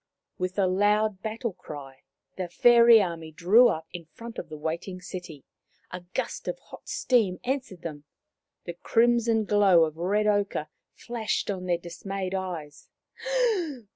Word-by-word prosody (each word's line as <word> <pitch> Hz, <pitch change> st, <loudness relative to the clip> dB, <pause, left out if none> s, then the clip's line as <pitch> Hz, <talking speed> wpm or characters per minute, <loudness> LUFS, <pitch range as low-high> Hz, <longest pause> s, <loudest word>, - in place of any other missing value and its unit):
With 185 Hz, +1 st, -3 dB
a 195 Hz, -, +3 dB
loud 205 Hz, +2 st, +2 dB
battle 225 Hz, 0 st, -3 dB
cry 135 Hz, -5 st, -10 dB, 0.3 s
the 185 Hz, -1 st, -3 dB
fairy 235 Hz, +3 st, +7 dB
army 165 Hz, -3 st, -5 dB
drew 200 Hz, +10 st, +5 dB
up 160 Hz, 0 st, -2 dB
in 175 Hz, -2 st, -7 dB
front 235 Hz, 0 st, -8 dB
of -, -, -8 dB
the 155 Hz, -, -7 dB
waiting 170 Hz, +5 st, -4 dB
city. 180 Hz, -6 st, -8 dB, 0.5 s
A 180 Hz, -, -5 dB, 0.2 s
gust -, -, -3 dB
of -, -, -2 dB
hot -, -, -14 dB
steam 220 Hz, -8 st, +1 dB
answered 250 Hz, -9 st, -3 dB
them; 150 Hz, -3 st, -7 dB, 0.6 s
the 175 Hz, -, -6 dB
crimson 230 Hz, +3 st, +2 dB
glow 200 Hz, -5 st, +5 dB
of 155 Hz, 0 st, -2 dB
red 200 Hz, +5 st, +1 dB
ochre 205 Hz, -7 st, 0 dB, 0.3 s
flashed 225 Hz, -3 st, -2 dB
on 185 Hz, -2 st, -5 dB
their 175 Hz, -1 st, +2 dB
dismayed 185 Hz, +2 st, -5 dB
eyes. 170 Hz, -6 st, -5 dB
185 Hz, 145 wpm, -27 LUFS, 170-220 Hz, 0.6 s, fairy